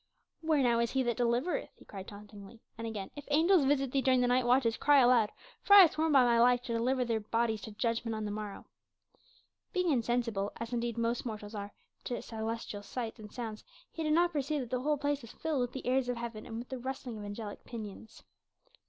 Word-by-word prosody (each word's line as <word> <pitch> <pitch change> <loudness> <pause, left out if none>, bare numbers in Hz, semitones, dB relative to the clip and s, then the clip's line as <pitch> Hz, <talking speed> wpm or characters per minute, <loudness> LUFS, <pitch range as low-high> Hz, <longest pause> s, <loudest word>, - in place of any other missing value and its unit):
"Where 315 -4 +2
now 235 -2 +3
is 235 0 +1
he 265 -1 +2
that 240 -2 0
delivereth?" 245 +7 0
he - - -18
cried 195 -2 -9
tauntingly. 205 +1 -12 0.2
And 230 0 -5
again, 205 -4 -5
"If 290 -1 -9
angels 320 +2 +4
visit 275 -2 +1
thee 275 - +1
during 260 -1 +3
the 245 - +2
night 250 0 +2
watches 245 -2 +3
cry 290 +3 +4
aloud, 240 -4 +5 0.3
for 405 - +6
I 400 - +12
have 345 - +6
sworn 315 0 0
by 270 -3 +6
my 235 -1 +3
life 245 +1 +4
to 235 - -4
deliver 250 +2 +1
thy 230 -2 0
bodies 220 0 -1
to 220 - -8
judgment 230 +1 -1
on 215 0 -3
the 205 - -3
morrow." 210 -1 -6 1.1
Being 365 -3 +1
insensible 230 -5 0
as 230 +1 -5
indeed 235 -1 -2
are - - -1
most 230 +1 0
mortals 215 -3 -6 0.5
to 245 - -3
celestial 225 -2 -5
sights 225 +1 -5
and 210 -1 -10
sounds 225 -3 -6 0.3
he 325 - -6
did 305 -1 +1
not 345 +2 +3
perceive 290 0 -1
that 245 - -7
the 250 -1 0
whole 300 +2 +1
place 285 0 -1
was 230 - -12
filled 310 -5 -1
with 245 0 -1
the 265 - -6
airs 255 0 +1
of 245 - -1
heaven 230 -2 -6
and 225 - -6
with 240 +2 -7
the 260 - -5
rustling 255 -3 -5
of - - -7
angelic 205 0 -7
pinions. 220 -1 -9
240 Hz, 225 wpm, -32 LUFS, 225-270 Hz, 1.1 s, I